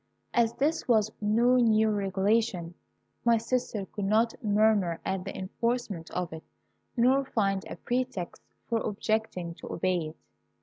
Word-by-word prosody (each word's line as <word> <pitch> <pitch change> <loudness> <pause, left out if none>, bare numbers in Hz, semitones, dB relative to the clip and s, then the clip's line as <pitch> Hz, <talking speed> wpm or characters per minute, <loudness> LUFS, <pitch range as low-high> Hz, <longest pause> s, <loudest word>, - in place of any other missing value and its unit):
"As 230 -1 +3
this 310 +4 0
was 220 -3 +3
no 235 +4 +4
new 220 -2 +4
regulation, 195 -3 0 0.5
my 235 -1 +5
sister 230 -3 -2
could 205 +1 -5
not 220 +3 +3
murmur 205 -5 +3
at 190 -1 -2
the 195 - -6
enforcement 200 -3 -2
of 180 -2 -3
it, 160 - -7 0.6
nor 260 +3 +4
find 195 -7 0
a - - -5
pretext 245 -8 -3 0.3
for 230 -1 +1
objecting 210 -5 -2
to - - -10
obey 175 -2 0
it. 155 - -11
215 Hz, 140 wpm, -29 LUFS, 190-235 Hz, 0.6 s, my